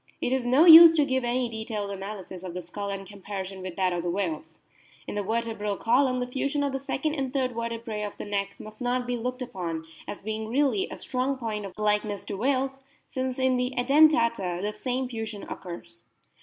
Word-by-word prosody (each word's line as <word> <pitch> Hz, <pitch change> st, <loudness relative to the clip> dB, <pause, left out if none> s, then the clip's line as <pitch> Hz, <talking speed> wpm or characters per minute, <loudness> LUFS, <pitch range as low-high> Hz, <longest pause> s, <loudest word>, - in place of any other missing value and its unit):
It 250 Hz, -, 0 dB
is 260 Hz, -2 st, 0 dB
no 270 Hz, +7 st, +5 dB
use 330 Hz, 0 st, +11 dB
to 300 Hz, -2 st, +4 dB
give 260 Hz, -2 st, 0 dB
any 245 Hz, +1 st, 0 dB
detailed 220 Hz, -3 st, -4 dB
analysis 195 Hz, -2 st, -7 dB
of 180 Hz, -2 st, -7 dB
the 180 Hz, -, -4 dB
skull 200 Hz, +4 st, -5 dB
and 195 Hz, 0 st, -4 dB
comparison 195 Hz, -1 st, -7 dB
with 185 Hz, -2 st, -6 dB
that 185 Hz, -2 st, +1 dB
of 175 Hz, -, -1 dB
the 175 Hz, -, -2 dB
whales. 160 Hz, -4 st, -3 dB, 0.5 s
In -, -, -6 dB
the 205 Hz, -, -1 dB
vertebral 220 Hz, -1 st, -2 dB
column 255 Hz, +2 st, +2 dB
the 250 Hz, -, -1 dB
fusion 275 Hz, +3 st, -1 dB
of 280 Hz, -, 0 dB
the 270 Hz, -, -2 dB
second 275 Hz, +2 st, -2 dB
and 270 Hz, -4 st, -2 dB
third 260 Hz, -2 st, 0 dB
vertebrse 230 Hz, -2 st, -3 dB
of 205 Hz, -, -11 dB
the -, -, -6 dB
neck 200 Hz, -1 st, -2 dB
must 215 Hz, +3 st, -11 dB
not 250 Hz, 0 st, 0 dB
be 245 Hz, 0 st, -1 dB
looked 250 Hz, +2 st, -3 dB
upon 170 Hz, -9 st, -5 dB, 0.2 s
as 205 Hz, -, -7 dB
being 220 Hz, +1 st, -3 dB
really 250 Hz, -4 st, +1 dB
a -, -, -7 dB
strong 260 Hz, +1 st, -1 dB
point 215 Hz, -4 st, -4 dB
of 190 Hz, -, -14 dB
likeness 210 Hz, -1 st, 0 dB
to -, -, -5 dB
whales, 270 Hz, +4 st, 0 dB, 0.2 s
since 260 Hz, -1 st, -3 dB
in 260 Hz, -1 st, +2 dB
the 250 Hz, +1 st, -1 dB
Edentata 240 Hz, -, +4 dB
the 205 Hz, +3 st, -2 dB
same 255 Hz, +2 st, -2 dB
fusion 220 Hz, -4 st, -5 dB
occurs. 170 Hz, -1 st, -9 dB
230 Hz, 210 wpm, -27 LUFS, 200-255 Hz, 0.5 s, use